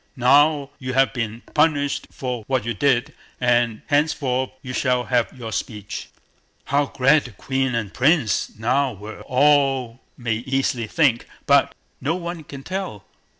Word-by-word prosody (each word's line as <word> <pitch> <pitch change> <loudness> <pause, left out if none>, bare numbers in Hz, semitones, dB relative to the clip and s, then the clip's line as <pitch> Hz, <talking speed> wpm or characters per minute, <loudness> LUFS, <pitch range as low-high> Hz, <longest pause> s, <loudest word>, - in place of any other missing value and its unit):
Now 140 +3 +4
you 130 0 -4
have 135 +1 +3
been 115 -2 -3
punished 150 -2 +1
for 125 -3 -4
what 130 -5 0
you 120 - -1
did, 135 +3 +1 0.3
and 120 -2 +1
henceforth 140 -4 +1
you 125 - -6
shall 125 -1 +1
have 120 -2 +1
your 115 -4 -8
speech." 105 0 -5 0.6
How 140 +1 +1
glad 135 +4 +3
the 125 - -9
Queen 130 +4 -1
and 110 -4 -3
Prince 135 -6 +1
now 130 +4 +1
were, 105 +2 -9
all 135 -3 +3 0.2
may 115 -3 -1
easily 125 -1 -1
think, 130 -3 +2 0.2
but - - +4 0.3
no 150 +5 0
one 170 -2 -5
can 140 -2 -10
tell. 185 - -5
130 Hz, 150 wpm, -22 LUFS, 120-140 Hz, 0.6 s, Now